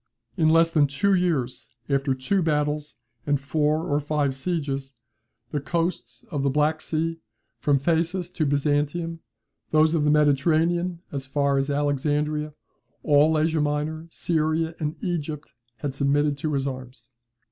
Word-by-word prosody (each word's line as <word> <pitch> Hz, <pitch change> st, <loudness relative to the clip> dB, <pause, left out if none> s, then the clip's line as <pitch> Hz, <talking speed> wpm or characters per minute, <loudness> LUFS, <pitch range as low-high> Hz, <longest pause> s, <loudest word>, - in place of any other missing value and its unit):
In 160 Hz, -4 st, +3 dB
less 165 Hz, +1 st, +5 dB
than 150 Hz, -3 st, +4 dB
two 170 Hz, +9 st, +1 dB
years, 165 Hz, -9 st, 0 dB, 0.2 s
after 135 Hz, -1 st, +1 dB
two 160 Hz, +10 st, 0 dB
battles 150 Hz, -3 st, -1 dB, 0.3 s
and 145 Hz, -1 st, +2 dB
four 150 Hz, +3 st, 0 dB
or 145 Hz, 0 st, +1 dB
five 145 Hz, -2 st, 0 dB
sieges, 135 Hz, -3 st, -3 dB, 0.6 s
the 150 Hz, -, -1 dB
coasts 145 Hz, -6 st, -3 dB
of 145 Hz, -4 st, -1 dB
the 140 Hz, -, +2 dB
Black 150 Hz, +3 st, +1 dB
Sea 165 Hz, +1 st, -2 dB, 0.4 s
from 145 Hz, +4 st, +3 dB
Phasis 170 Hz, +5 st, 0 dB
to 155 Hz, -4 st, 0 dB
Byzantium, 145 Hz, +4 st, 0 dB, 0.5 s
those 155 Hz, +1 st, +4 dB
of 160 Hz, -3 st, +2 dB
the 150 Hz, -, +3 dB
Mediterranean 165 Hz, +4 st, +2 dB
as 135 Hz, -2 st, -4 dB
far 140 Hz, 0 st, +1 dB
as 135 Hz, +1 st, -1 dB
Alexandria, 145 Hz, +1 st, 0 dB, 0.5 s
all 150 Hz, +1 st, +4 dB
Asia 160 Hz, 0 st, +1 dB
Minor, 150 Hz, +2 st, -2 dB
Syria, 160 Hz, 0 st, 0 dB
and 155 Hz, -1 st, -2 dB
Egypt, 155 Hz, -, -3 dB, 0.2 s
had 135 Hz, +4 st, -4 dB
submitted 145 Hz, +1 st, +1 dB
to 155 Hz, +1 st, -2 dB
his 135 Hz, -1 st, 0 dB
arms. 130 Hz, -2 st, -7 dB
150 Hz, 145 wpm, -25 LUFS, 140-160 Hz, 0.6 s, less